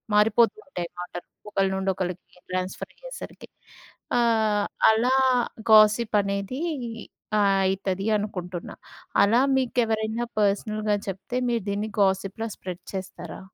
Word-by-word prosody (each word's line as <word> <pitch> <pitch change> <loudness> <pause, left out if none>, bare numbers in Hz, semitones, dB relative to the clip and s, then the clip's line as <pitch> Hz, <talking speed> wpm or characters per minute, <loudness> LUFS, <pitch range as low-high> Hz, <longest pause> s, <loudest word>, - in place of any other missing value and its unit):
మారిపోతూంటాయి 225 - +2
మాటలు, 175 0 -7 0.2
ఒకళ్ళ 195 -1 +2
నుండి 190 0 -1
ఒకళ్ళకి 180 -1 -5
ట్రాన్స్‌ఫరయ్యేసరికి. 185 - -6 0.7
ఆహ్, 220 -3 +2 0.3
అలా 235 +4 +2 0.6
గాసిప్ 215 +1 +6
అనేదీ 200 +7 -3 0.8
ఆయితది 195 -1 +1
అనుకుంటున్నా. 180 -4 -5 0.5
అలా 215 +4 +5 0.2
మీకెవరైనా 230 -2 0
పర్సనల్‌గా 210 +1 +1
చెప్తే, 195 +6 -5
మీరు 230 -4 0
దీన్ని 205 +2 -2
గాసిప్‌లా 195 +3 0
స్ప్రెడ్ 180 -2 -7
చేస్తారా? 185 -3 -6
205 Hz, 95 wpm, -25 LUFS, 190-225 Hz, 0.8 s, గాసిప్